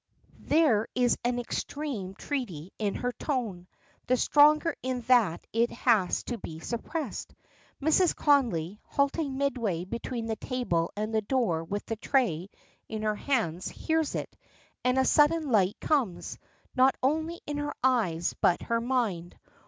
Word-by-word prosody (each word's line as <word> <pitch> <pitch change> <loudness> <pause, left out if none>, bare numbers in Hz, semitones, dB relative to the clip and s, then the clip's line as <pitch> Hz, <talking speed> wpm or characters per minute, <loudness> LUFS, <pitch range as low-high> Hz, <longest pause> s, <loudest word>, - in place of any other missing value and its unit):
There 275 -9 +3
is 245 -1 +3
an 245 0 0
extreme 245 -5 -4
treaty 195 - -4
in 210 -2 -1
her 245 - -1
tone; 230 - -3 0.4
the 255 - +3
stronger 300 +4 +5
in 255 -1 -2
that 230 -8 +3
it 230 +1 +2
has 220 -7 +2
to 240 -2 -4
be 160 -4 -7
suppressed. 245 - -5 0.4
Mrs. 315 +5 +3
Connolly, 210 - +2
halting 280 0 0
midway 235 -11 -1
between 235 +3 -4
the 220 -1 -2
table 175 -11 -1
and 215 +1 -2
the 220 - +2
door 205 -8 0
with 205 +5 -4
the 225 - -4
tray 200 - 0 0.4
in 215 -1 -4
her 215 0 +1
hands, 205 - -1
hears 320 -2 -1
it, - - -5 0.5
and 250 +1 +2
a 265 - +4
sudden 300 -1 +3
light 200 -3 +2
comes, 255 - -1 0.4
not 265 0 +5
only 315 +5 0
into 290 0 -3
her 290 - -4
eyes, 200 -11 +2
but 175 - +3
her 230 0 0
mind. 230 -9 -1
245 Hz, 145 wpm, -28 LUFS, 200-280 Hz, 0.5 s, stronger